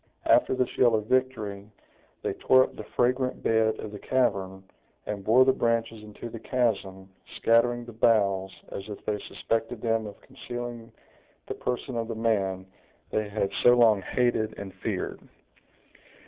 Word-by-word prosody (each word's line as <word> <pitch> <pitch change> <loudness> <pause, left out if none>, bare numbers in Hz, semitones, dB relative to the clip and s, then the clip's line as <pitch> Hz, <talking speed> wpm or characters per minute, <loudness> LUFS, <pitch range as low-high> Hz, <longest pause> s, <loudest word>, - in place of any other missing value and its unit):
After - - +4
this 130 -1 -1
yell 120 -3 +5
of 105 -1 -1
victory, 110 -5 -1 0.5
they - - -1
tore 130 0 +5
up - - -6
the - - -7
fragrant 125 +1 +1
bed 110 -1 +2
of 105 - -6
the 105 - -8
cavern, 95 -8 0 0.4
and 100 -2 -4
bore 120 +5 +5
the 130 - +5
branches 115 -2 0
into 105 +2 -9
the 115 0 -8
chasm, 100 -7 -1 0.3
scattering 120 +1 +2
the 120 - -9
boughs, 100 -4 +2 0.2
as 100 +2 -7
if 105 - -8
they 105 -1 -1
suspected 115 +2 -3
them 115 -1 0
of 100 - -11
concealing 120 -1 -7 0.5
the - - -4
person 125 0 -3
of 115 -1 -2
the 115 - -4
man 100 -5 0 0.5
they 110 -1 -1
had 100 -1 -1
so 120 0 +7
long 110 -4 +5
hated 110 -1 0
and 100 -2 -7
feared. - - -3
115 Hz, 160 wpm, -27 LUFS, 105-120 Hz, 0.5 s, so